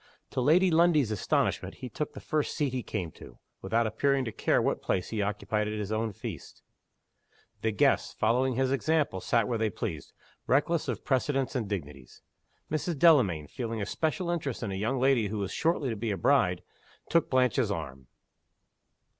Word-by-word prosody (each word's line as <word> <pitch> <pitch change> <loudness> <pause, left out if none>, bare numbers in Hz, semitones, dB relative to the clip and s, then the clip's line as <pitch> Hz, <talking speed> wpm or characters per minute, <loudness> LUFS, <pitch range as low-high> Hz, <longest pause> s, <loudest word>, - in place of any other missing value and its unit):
To 130 - -1
Lady 175 +7 +4
Lundie's 160 -7 +4
astonishment 105 - 0
he 130 - -7
took 145 +6 -4
the - - -8
first 155 -2 -2
seat 145 -5 0
he 130 - -1
came 90 -6 -4
to, - - -14 0.2
without 115 +5 +1
appearing 135 +4 +1
to 110 - -3
care - - +1
what - - 0
place 90 - -1
he 110 -2 -2
occupied 105 +1 -1
at 105 0 -3
his 105 -1 -4
own 110 0 -1
feast. 95 - -8 1.0
The 110 - +1
guests, 105 - +2
following 125 +3 +1
his 130 +1 +1
example, 140 -7 +1
sat 115 +1 +1
where 115 -2 -1
they 110 -1 +1
pleased, 100 - -5 0.4
reckless 150 +4 +2
of 120 -5 -4
precedents 135 0 0
and 115 -5 -1
dignities. 75 -10 -7 0.5
Mrs. 155 +1 -1
Delamayn, 125 - +4
feeling 115 - -4
a 100 - -2
special 165 - -1
interest 145 -9 -3
in 105 - -3
a - - -3
young 110 +7 -1
lady 130 -4 +3
who 105 +2 -4
was 100 -1 -3
shortly 160 -4 0
to - - -2
be 110 +2 -3
a 100 - -1
bride, 120 -10 +2 0.4
took 170 -2 +2
Blanche's 130 -2 +2
arm. 70 -9 -5
120 Hz, 180 wpm, -29 LUFS, 105-140 Hz, 1.0 s, Lady